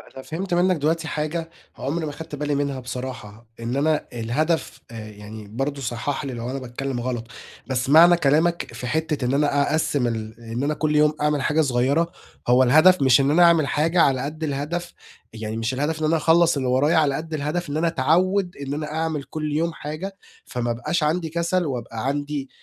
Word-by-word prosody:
أنا 130 - -8
فهِمت 175 +3 -4
منك 180 +1 +3
دلوقتي 160 +2 0
حاجة 160 +2 -3 0.3
عمري 155 +4 -2
ما 150 - -4
خدت 160 0 -8
بالي 145 0 -1
منها 140 -2 -1
بصراحة، 125 -3 -7
إن 115 +2 -3
أنا 150 +2 +1
الهدف 140 +8 -1
آآ 110 -2 -8
يعني، 105 0 -10
برضه 135 +6 -3
صحِّح 130 +4 -3
لي 135 - -4
لو 120 +1 -5
أنا 135 - -3
باتكلَّم 130 0 -4
غلط. 120 -2 -3 0.4
بس 130 0 -1
معنى 170 +4 +8
كلامك 165 +3 +1
في 125 - -6
حتَّة 155 -1 -1
إن 125 - 0
أنا 145 0 +2
أقسّم 145 -4 +1
ال 110 0 -5
إن 115 +2 -4
أنا 150 +2 +1
كل 150 0 0
يوم 150 0 +4
أعمل 150 -2 +1
حاجة 150 +4 +2
صغيرة، 140 +5 +1 0.4
هو 125 +2 +5
الهدف، 155 +8 +6
مش 130 -1 +5
إن 140 +1 +2
أنا 175 +3 +5
أعمل 165 -4 +5
حاجة 165 +3 +2
على 135 -4 +3
قد 155 +3 -5
الهدَف 155 +5 -3 0.4
يعني 110 0 -5
مش 115 +3 -1
الهدَف 150 +4 -1
إن 155 - +1
أنا 160 +1 +3
أخلَص 165 0 +4
اللي 130 -2 -1
ورايا، 135 +6 +3
على 145 -3 +3
قد 160 +2 -5
الهدَف 155 +3 -2
إن 145 - -2
أنا 165 +1 +1
اتعوَّد 175 +5 +1
إن 140 0 -5
أنا 150 0 -4
أعمل 160 -3 -2
كل 150 -1 -4
يوم 165 +1 0
حاجة، 170 +7 -6 0.3
فما 120 -1 -2
أبقاش 150 +8 -1
عندي 160 +2 0
كسل 170 +2 0
وأبقى 120 -3 -4
عندي 145 -1 -3
145 Hz, 200 wpm, -23 LUFS, 130-160 Hz, 0.4 s, معنى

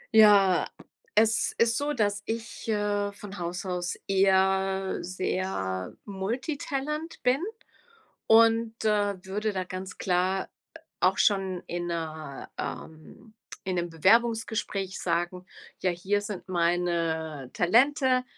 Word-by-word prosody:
Ja, 200 -4 +6 0.5
es 220 0 +3
ist 230 0 +3
so, 290 +2 0
dass 205 -5 0
ich, 230 0 -5
äh, 205 -1 0
von 200 -2 -9
Haus 175 +3 -4
aus 180 -1 -2
eher 190 0 +2
sehr 180 - -2
multitalent 275 - -3
bin 250 +2 +3 0.9
und, 225 0 +4
äh, 205 -1 +2
würde 210 +2 -2
da 185 - -1
ganz 185 +1 -7
klar 185 +1 0 0.5
auch 185 +1 +3
schon 190 -3 +1
in 175 0 -4
'ner, 155 -4 -5
ähm 160 +8 -8 0.3
in 185 - -2
'nem 175 0 -1
Bewerbungsgespräch 210 +1 +1
sagen: 180 +1 -1 0.3
„Ja, 185 - +1
hier 190 +4 0
sind 205 -2 -6
meine 170 -5 0
Talente, 255 - +3
195 Hz, 110 wpm, -27 LUFS, 180-220 Hz, 0.9 s, Ja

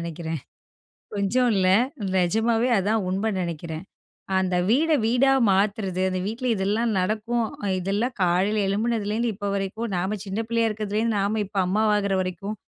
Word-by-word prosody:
நெனைக்கிறேன். 165 -2 -4 0.7
கொஞ்சம் 230 +5 +1
இல்ல, 185 -1 +2 0.5
நிஜமாவே 225 +7 +2
அதான் 210 +2 +1
உண்மைன்னு 195 0 -1
நெனைக்கிறேன். 165 0 -5 0.5
அந்த 185 -1 +1
வீட 305 +8 +3 0.2
வீடா 255 +4 +3 0.2
மாத்துறது, 195 -1 +1
அந்த 185 0 -2
வீட்ல 235 +4 -3
இதெல்லாம் 210 +4 0
நடக்கும். 220 +4 0 0.3
இதெல்லாம் 205 +7 -1
காலையில் 185 +4 +2
எழும்புனதுலேருந்து 220 +2 0
இப்போ 205 0 -4
வரைக்கும் 200 +3 -3
நாம 190 +4 -1
சின்ன 195 +2 -3
பிள்ளையா 230 0 +1
இருக்கிறதுலேருந்து 215 +1 -1
நாம 205 +2 0
இப்போ 200 0 -3
அம்மாவாகிற 205 -1 +2
வரைக்கும், 190 +3 -4
205 Hz, 130 wpm, -24 LUFS, 190-225 Hz, 0.7 s, வீட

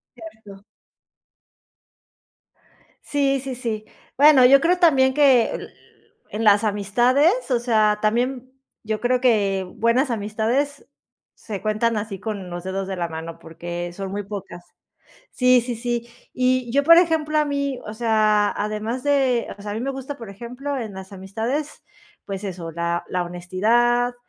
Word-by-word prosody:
Cierto. 215 -3 -13 2.4
Sí, 275 -2 0
sí, 265 -1 -5
sí. 220 -3 -4 0.3
Bueno, 285 -3 +7
yo 275 +2 +7
creo 355 +2 +2
también 265 -6 +4
que 265 -5 +4 0.8
en 220 +2 -4
las 205 0 +5
amistades, 245 - +2
o 240 - +3
sea, 215 -3 +2
también, 250 +4 -1 0.3
yo 215 0 -3
creo 250 +1 +1
que 200 -6 +2
buenas 240 +4 +2
amistades 230 +7 -2 0.5
se 205 -4 -7
cuentan 215 +1 0
así 205 -2 -5
con 205 -4 -5
los 175 0 -6
dedos 190 +1 -4
de 190 - -4
la 170 -1 -2
mano, 165 +1 -7
porque 175 +1 -6
son 195 0 -6
muy 205 +1 -4
pocas. 195 -3 -8 0.7
Sí, 250 -1 +4
sí, 240 -1 -4
sí. 240 0 -3 0.2
Y 255 -1 0
yo, 280 +2 +3
por 335 +3 +7
ejemplo, 320 -3 +2
a 300 - +3
mí, 280 -2 -2
o 210 - -7
sea, 215 -2 +2
además 215 +4 -3
de, 270 -4 +1
o - - -13
sea, 205 - -5
a - - -4
mí 220 - -4
me 270 +2 -2
gusta, 270 +1 -6
por 230 -6 -9
ejemplo, 250 +7 -6
en 220 -5 -6
las 190 +1 -10
amistades, 225 +10 -4 0.4
pues 195 0 -6
eso, 175 -4 -6
la 170 +1 -2
la 180 - -1
honestidad, 230 +8 +1
230 Hz, 155 wpm, -22 LUFS, 200-260 Hz, 2.4 s, Bueno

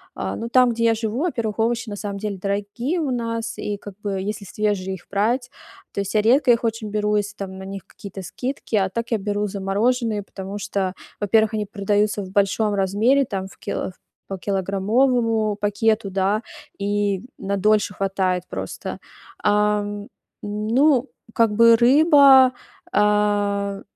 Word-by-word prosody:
а, - - -3
ну, 230 +1 -5
там, 250 -1 +5
где 230 0 -1
я 225 -1 +4
живу, 225 +2 -3
во-первых, 230 -10 -2
овощи 230 0 0
на 205 - -5
самом 200 -1 -5
деле 200 -1 -4
дорогие 205 - -2
у 285 -5 -1
нас, 230 -1 -3
и 205 -1 -3
как 205 -1 -10
бы, 205 -1 -3
если 205 +1 -4
свежие 190 -2 -2
их 175 - -15
брать, 240 +6 0 0.4
то - - -3
есть 200 +2 -5
я 210 - +5
редко 250 +3 +4
их 235 0 +2
очень 225 -2 -2
беру, 210 0 0
если 205 0 -2
там 190 -1 -7
на - - -8
них 195 -1 -7
какие-то 195 -2 -10
скидки, 255 +1 -4
а 190 -2 +2
так 230 +4 -4
я 225 - +3
беру 205 +1 -1
замороженные. 195 +2 -1 0.4
Потому 195 +1 -7
что, 190 -2 -2 0.3
во-первых, 220 +2 +2
они 210 -1 -1
продаются 205 0 0
в 185 - -9
большом 205 +2 +1
размере, 205 +8 +2
там, 190 -3 -4
в - - -16
кило - - -4 0.4
по 195 -2 -5
килограммовому 215 +3 +1
пакету, 210 0 +1
да, 195 +3 0 0.4
и 200 -1 0 0.2
на 200 0 -2
дольше 210 0 +2
хватает 185 -2 -1
просто. - - -5 0.5
Ам, 205 0 +1 0.3
ну, 235 +7 +2 0.3
как 230 -2 +3
бы, 230 +2 +7
рыба, 270 0 +6 0.4
а, 205 -1 +1
210 Hz, 165 wpm, -22 LUFS, 200-230 Hz, 0.5 s, бы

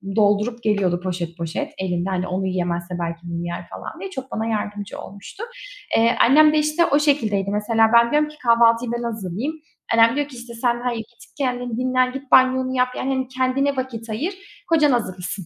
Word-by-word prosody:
doldurup 215 +3 +2
geliyordu 200 -5 +1
poşet 175 -2 -4
poşet. 180 - -4
Elinde 180 -1 -2
hani 185 -1 -1
onu 190 +1 -2
yiyemezse 175 -1 -2
belki 170 -1 -3
bunu 170 0 -4
yer, 170 - -6
falan - - -8
diye. 390 - -6
Çok 265 -5 -7
bana 220 - -2
yardımcı 210 -2 -4
olmuştu. 200 - -10 0.5
Eee, 230 +2 +4
annem 300 +4 +6
de - - +3
işte 305 +3 +2
o 285 - +3
şekildeydi 220 -10 +1
mesela. 225 +2 +3
Ben 235 0 +5
diyorum 300 0 +2
ki: 300 - -14
kahvaltıyı 230 0 +4
ben 240 0 -3
hazırlayayım. 220 - -3 0.4
Annem 230 +2 +5
diyor 290 -1 0
ki 280 - -12
işte, 240 0 -9
sen 240 +1 0
hayır, 245 -2 -1
git 230 +1 -12
kendin 245 -4 -2
dinlen, 255 0 +1
git 270 0 -8
banyonu 260 0 +4
yap, 250 0 +3
yani 265 - -2
hani 260 -1 -1
kendine 260 +2 0
vakit 235 -3 -4
ayır, 290 - -2 0.4
kocan 305 -3 +4
hazırlasın. 190 -5 -3
235 Hz, 190 wpm, -22 LUFS, 200-260 Hz, 0.5 s, annem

